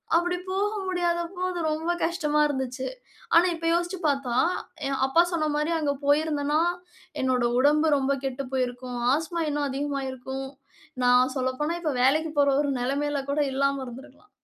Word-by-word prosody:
அப்டி 350 +1 +2
போக 395 +2 0 0.2
முடியாத 350 -2 0 0.2
போது 365 0 -2
ரொம்ப 320 +3 -1
கஷ்டமா 320 -3 0
இருந்துச்சு. 265 -2 -3 0.5
ஆனா, 335 +2 +7
இப்ப 330 0 -7
யோசிச்சு 345 +2 -1
பார்த்தா, 275 -4 0 0.5
என் 275 -1 -2
அப்பா 330 +6 +5
சொன்ன 320 -3 0
மாரி, 300 +2 0
அங்க 295 -3 0
போயிருந்தேன்னா, 295 0 +2 0.6
என்னுடைய 250 -2 +2
உடம்பு 300 +4 +4
ரொம்ப 275 0 +1
கெட்டு 270 +1 -3
போயிருக்கும். 250 -1 -2 0.2
ஆஸ்மா 325 +2 -3
இன்னும் 290 -1 -1
அதிகமாயிருக்கும். 270 -1 -4 0.6
நான் 250 +1 +4
சொல்லப்போனா 260 +5 -1
இப்ப, 310 -4 -1
வேலைக்கு 310 +4 +3
போற 280 0 +5
ஒரு 285 -1 0
நிலைமையில் 280 +2 -1
கூட 290 - 0
இல்லாம 275 0 0
இருந்திருக்கலாம். 265 +9 -12
285 Hz, 145 wpm, -26 LUFS, 265-320 Hz, 0.6 s, ஆனா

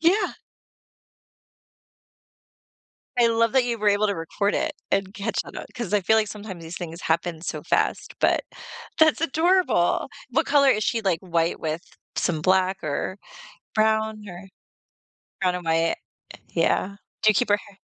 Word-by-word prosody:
Yeah. 350 +7 +3 2.8
I 240 -1 +5
love 230 0 +2
that 260 -2 +4
you 235 -2 -2
were 210 - +2
able 205 +1 +3
to 200 - 0
record 195 +5 -1
it 315 0 0 0.2
and 195 -1 0
catch 200 - -3
on - - -11 0.2
'cause 235 -5 -4
I 205 - +4
feel 220 +4 +3
like 215 -1 +2
sometimes 205 -5 -8
these 165 +2 -8
things 170 -1 -6
happen 165 0 0
so - - -4
fast, - - 0
but, - - +3 0.5
that's 315 -1 +5
adorable. 330 - +2 0.2
What - - +1
color 280 -2 +5
is 215 -5 +3
she, 230 - +1
like, 185 -5 +1
white 170 -2 0
with 160 +1 -2 0.3
some 160 -3 0
black, 190 +1 +2
or 155 +6 -3 0.6
brown, 220 0 +1
or 180 +1 -9 0.9
brown 180 -2 +2
or - - -4
white? 165 -1 +1 0.5
Yeah. 200 +1 0 0.3
Do 215 - +6
you - - +2
keep 245 - +2
her 205 - +5
hair 200 -1 -19
205 Hz, 155 wpm, -24 LUFS, 175-230 Hz, 2.8 s, Do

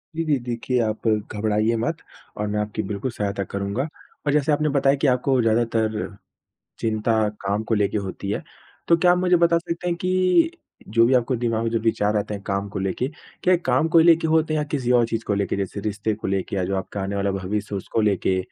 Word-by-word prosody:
जी, 165 - -1
जी, 150 -3 +2
देखिए 120 +1 -2
आप 110 +1 -2
घबराइए 105 +1 +1
मत 115 - -1 0.4
और 105 - -2
मैं 105 0 -1
आपकी 105 +1 -2
बिल्कुल 105 +5 -3
सहायता 100 -3 -2
करूँगा 100 - -3 0.4
और 145 - +2
जैसे 150 0 +2
आपने 150 +1 +2
बताया 140 0 +3
कि 140 +1 0
आपको 125 0 +2
ज़्यादातर 110 -2 0 0.6
चिंता 110 0 0 0.3
काम 100 +2 -1
को 115 - +3
लेके 105 0 +1
होती 100 0 -5
है, - - -2 0.5
तो 170 - +6
क्या 175 +2 +4
आप 180 - +2
मुझे 180 -1 +3
बता 170 0 +4
सकते 170 +1 -5
हैं 170 - 0
कि 185 - +2 0.4
जो 115 +2 +4
भी 130 - +3
आपको 125 0 +2
दिमाग 115 -1 -1
में 115 - -1
जो 115 - +1
विचार 105 -2 +1
आते 105 0 -2
हैं 100 - -7
काम 100 +1 -2
को - - -5
लेके, 95 +7 -1 0.3
क्या 185 - +4
ये - - +2
काम 130 +5 +2
को 165 0 +5
लेके 165 0 +5
होते 160 0 +2
हैं 155 - +1
या 150 - -1
किसी 140 -4 -2
और 120 -2 +4
चीज़ 115 0 -3
को 105 - 0
लेके? 100 0 -1
जैसे 100 +1 -3
रिश्ते 105 +1 -2
को 110 - -6
लेके 95 0 -2
या 95 - 0
जो 95 +1 -1
आपका 95 +1 -4
आने 100 +1 -3
वाला 100 0 0
भविष्य 100 +2 -3
है - - 0
उसको 110 +3 -2
लेके 95 -3 +1
115 Hz, 230 wpm, -23 LUFS, 100-140 Hz, 0.6 s, तो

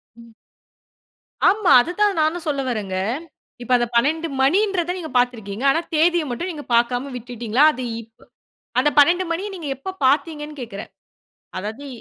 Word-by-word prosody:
ம். 230 -1 -16 1.2
ஆமா. 400 -2 +2
அதுதான் 390 +6 0
நானும் 315 +2 0
சொல்ல 280 -2 0
வர்றேங்க. 205 -6 -3 0.7
இப்ப 240 - -6
அந்த 240 0 0
12 310 +7 +2
மணின்றத 360 +4 +2
நீங்க 330 -3 -6
பார்த்துருக்கீங்க, 235 -3 -1
ஆனா 320 - +1 0.2
தேதியை 335 +1 +3
மட்டும் 250 +10 -3
நீங்க 300 -3 -8
பார்க்காம 245 +3 +1
விட்டுட்டீங்களா? 240 +1 -1
அது 255 - -6 0.2
இப்-அந்த 225 0 -23 0.5
12 350 +6 +4
மணிய 375 +5 -2
நீங்க 325 -6 -6
எப்போ 325 +9 -6 0.2
பார்த்தீங்கன்னு 295 +1 -1
கேக்றேன்? 210 -4 -8 0.7
அதாவது... 220 +9 -6
285 Hz, 135 wpm, -21 LUFS, 240-340 Hz, 1.2 s, 12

